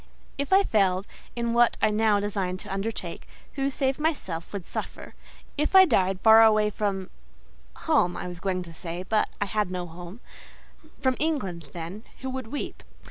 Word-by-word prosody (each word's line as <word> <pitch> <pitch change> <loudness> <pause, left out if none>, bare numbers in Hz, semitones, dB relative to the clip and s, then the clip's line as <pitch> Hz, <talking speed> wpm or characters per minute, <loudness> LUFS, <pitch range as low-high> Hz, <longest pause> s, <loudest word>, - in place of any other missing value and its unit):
If 280 - -2
I 390 +1 +6
failed 195 - +2 0.3
in 235 -1 -1
what 240 0 +4
I - - +3
now 210 -1 +3
designed 195 -3 -2
to - - -7
undertake, 205 +3 -4 0.3
who, 275 -1 0
save 270 0 -1
myself, 235 - -2
would 200 -4 -5
suffer? - - -6 0.5
If 305 +5 0
I 380 0 +10
died 190 - +2
far 220 0 +8
away 215 -1 +5
from—home, 65 - -3
I - - -5
was 175 -1 -7
going 185 -1 -1
to 170 -1 -11
say, 170 +2 -6
but 215 +3 +1
I 205 - +1
had 210 -1 -1
no 180 -1 -3
home—from 205 - -7
England, 195 - -1
then, 175 +5 -7 0.2
who 260 -1 -3
would 260 -3 -5
weep? 285 +6 -5
205 Hz, 165 wpm, -26 LUFS, 180-240 Hz, 0.5 s, I